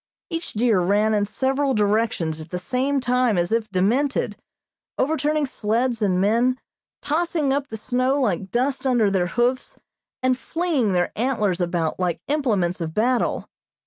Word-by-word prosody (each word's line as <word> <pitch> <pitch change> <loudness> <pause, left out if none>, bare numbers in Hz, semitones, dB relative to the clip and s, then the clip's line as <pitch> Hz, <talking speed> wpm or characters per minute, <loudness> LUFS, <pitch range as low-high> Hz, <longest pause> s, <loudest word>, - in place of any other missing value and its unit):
Each 330 0 -4
deer 220 -3 +2
ran 205 +4 +2
in 205 -1 +1
several 265 +5 0
directions 205 -7 0
at 155 - -10
the 180 - -3
same 265 +8 0
time 250 -4 +2
as 175 +2 0
if 225 -1 0
demented, 230 +10 +1 0.6
overturning 305 +1 +1
sleds 235 -1 -1
and 185 -3 +2
men, 235 +6 +2 0.4
tossing 310 -2 0
up 280 0 -1
the 220 - -6
snow 255 +5 0
like 195 -7 -1
dust 265 +4 0
under 235 -6 +3
their 185 -2 +1
hoofs, 245 +6 -1 0.5
and 255 0 +3
flinging 295 - -1
their 175 -1 +1
antlers 210 -7 0
about 170 -2 -1
like 180 -2 -1
implements 210 - 0
of 160 -1 -4
battle. 245 +3 +1
235 Hz, 150 wpm, -23 LUFS, 195-265 Hz, 0.6 s, under